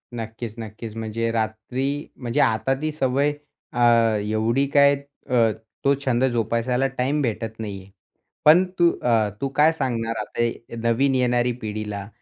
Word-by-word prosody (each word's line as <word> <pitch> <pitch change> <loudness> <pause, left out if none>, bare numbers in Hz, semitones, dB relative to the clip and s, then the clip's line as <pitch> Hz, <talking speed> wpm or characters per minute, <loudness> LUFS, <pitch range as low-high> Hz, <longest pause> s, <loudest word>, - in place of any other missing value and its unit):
नक्कीच, 115 0 -6
नक्कीच. 110 0 -7
म्हणजे 115 +1 -2
रात्री 120 +6 -2
म्हणजे 120 -2 -3
आता 110 +4 +2
ती 155 0 -1
सवय 140 0 +1 0.4
अ, 120 - +1 0.5
एवढी 115 +5 +1
काय 140 0 +6 0.3
अ, 115 -3 +4 0.3
तो 140 - +5
छंद 125 -1 +2
जोपासायला 120 +3 0
टाईम 135 +3 -1
भेटत 115 -3 -3
नाही 100 -3 -5
आहे. 95 +1 -18 0.5
पण 160 +5 +8 0.2
तू 170 0 +6
अ, 115 -3 +2
तू 135 - 0
काय 155 +2 +5
सांगणार 115 -6 -2
आता 120 0 -1 0.4
नवीन 135 +4 +2
ये 130 - +2
येणारी 125 0 +2
पिढीला? 105 -2 -4
120 Hz, 145 wpm, -23 LUFS, 110-135 Hz, 0.5 s, पण